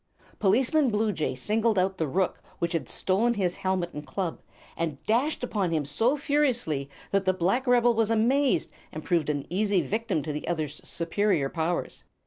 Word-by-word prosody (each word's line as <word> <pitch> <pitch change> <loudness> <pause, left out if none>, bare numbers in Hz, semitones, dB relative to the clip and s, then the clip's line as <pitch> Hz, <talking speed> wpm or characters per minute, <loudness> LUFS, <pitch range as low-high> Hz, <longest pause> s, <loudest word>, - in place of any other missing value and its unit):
Policeman 255 +8 +3
Bluejay 210 - 0
singled 215 - +1
out 190 +1 +1
the 160 - 0
rook 185 +6 -1 0.2
which 170 -1 -1
had 155 -7 -2
stolen 225 +6 +1
his 185 -4 0
helmet 185 -2 -1
and 150 - -6
club, 175 +2 -4 0.3
and 160 -4 -2
dashed 250 +6 +1
upon 205 -7 0
him 155 -3 0
so 225 - +1
furiously 245 - 0 0.2
that 195 -1 +1
the 185 0 +2
black 195 +9 0
rebel 245 -1 +5
was 225 -1 +1
amazed, 250 +5 +2 0.2
and 155 - -7
proved 165 -4 +1
an 145 -2 -1
easy 200 0 +2
victim 215 -7 -1
to 150 0 -3
the 150 - -5
other's 155 -3 -3
superior 170 -3 0
powers. 165 +2 -2
190 Hz, 170 wpm, -27 LUFS, 165-230 Hz, 0.3 s, rebel